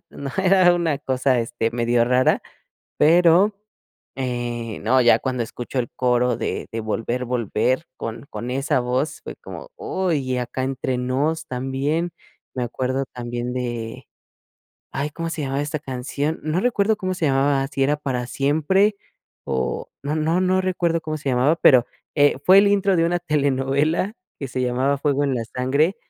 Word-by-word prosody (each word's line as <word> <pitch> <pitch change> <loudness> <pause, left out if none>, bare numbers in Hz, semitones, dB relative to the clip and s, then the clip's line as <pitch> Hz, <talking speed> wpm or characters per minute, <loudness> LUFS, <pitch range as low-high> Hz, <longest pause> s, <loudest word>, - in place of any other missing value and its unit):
¿no?, 140 -1 -6
era 185 -2 +5
una 165 -5 0
cosa, 130 -2 +1
este, 115 0 -2
medio 120 0 +2
rara, 125 +1 +2 0.6
pero, 175 +5 +5 0.6
eh, 120 -3 -3
no, 130 +4 +3
ya 120 - +5
cuando 125 -3 -2
escucho 120 +3 -7
el 120 - -2
coro 125 -1 +2
de - - -3
de 115 - -3
Volver, 115 +3 -2
Volver 125 +4 0
con 115 +3 -6
con 120 - -5
esa 135 +1 0
voz, 125 +5 -1
fue - - -7
como: - - -10
"¡Uy!", 190 - -1
y 130 -2 -2
Acá 125 +1 -3
Entre 130 -1 -2
Nos 140 +6 -1
también, 135 +7 -1 0.4
me 125 - -1
acuerdo 130 +2 -2
también 120 0 -4
de, 120 -3 -4 0.9
ay, 140 +2 -2
¿cómo 165 +2 -4
se 165 - -4
llamaba 135 +1 -1
esta 150 +1 -3
canción?, 140 +3 -3
no 155 +3 0
recuerdo 220 -2 +2
cómo 185 -1 -2
se 170 -3 -1
llamaba, 135 0 +2
si 135 - -2
era 145 +2 +2
Para 130 -4 -3
Siempre 160 +11 +2 0.5
o 65 -1 -2
no 145 +2 -2
no 160 +3 +1
no 185 0 +2
recuerdo 175 -3 0
cómo 155 -1 -4
se 145 -2 -3
llamaba, 130 +6 +3
pero, 125 -6 +5 0.3
eh, 145 -1 +4
fue 190 +4 +8
el 200 0 +6
intro 200 -1 +2
de 165 - +3
una 175 +1 +1
telenovela 145 +3 0 0.3
que 135 - -5
se 130 +1 -3
llamaba 130 +3 +1
Fuego 145 0 +1
En 135 - 0
La 115 -2 -2
Sangre, 140 +8 +2
135 Hz, 170 wpm, -22 LUFS, 125-160 Hz, 0.9 s, fue